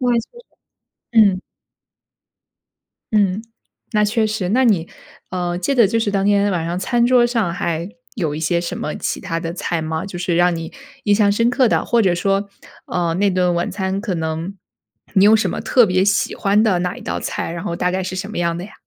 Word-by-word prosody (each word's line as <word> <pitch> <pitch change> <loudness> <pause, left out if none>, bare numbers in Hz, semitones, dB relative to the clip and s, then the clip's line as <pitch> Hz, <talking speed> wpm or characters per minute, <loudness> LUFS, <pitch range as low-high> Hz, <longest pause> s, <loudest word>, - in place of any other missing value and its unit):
哇， 245 -1 +2
确 230 - +3
实， 480 - -16 0.8
嗯。 190 -2 +3 1.7
嗯， 205 -1 +2 0.5
那 210 0 +3
确 220 +1 +1
实， 210 -4 -2
那 255 +5 +3
你， 180 -7 +2 0.4
呃， 175 -1 -2
记 230 +10 -1
得 235 -6 +5
就 230 +3 0
是 210 -2 0
当 195 -1 0
天 205 0 +3
晚 165 -2 -1
上 175 +1 -2
餐 240 +4 +1
桌 245 -1 +5
上 230 -8 0
还 170 +2 -2 0.3
有 160 -8 -2
一 - - -4
些 170 +2 +1
什 170 - -4
么 150 - -4
其 - - -3
它 165 0 -3
的 165 0 -4
菜 170 -2 -2
吗？ 160 +3 -3
就 180 -3 -7
是 175 -1 -1
让 175 0 +3
你 165 0 -6 0.3
印 205 -1 +3
象 205 -1 +3
深 230 +3 +2
刻 250 -2 +3
的， - - +1
或 235 -1 +3
者 185 -4 +3
说 195 +3 0 0.4
呃， 170 -2 -1
那 200 +3 +2
顿 180 -1 +1
晚 170 - -1
餐 190 0 -2
可 210 -5 -2
能 165 +4 -4 0.6
你 195 -1 +5
有 215 +2 +7
什 215 - 0
么 - - -4
特 245 -3 +4
别 185 0 +2
喜 200 +1 +1
欢 200 +2 +2
的 195 -6 +2
哪 180 0 -2
一 - - -10
道 - - -3
菜， - - -4
然 170 +2 -5
后 170 -4 -3
大 180 0 0
概 190 0 -1
是 185 0 -5
什 195 +2 -4
么 215 - -6
样 170 -1 0
的 180 - -6
呀？ - - -14
190 Hz, 240 characters per minute, -19 LUFS, 175-210 Hz, 1.7 s, 有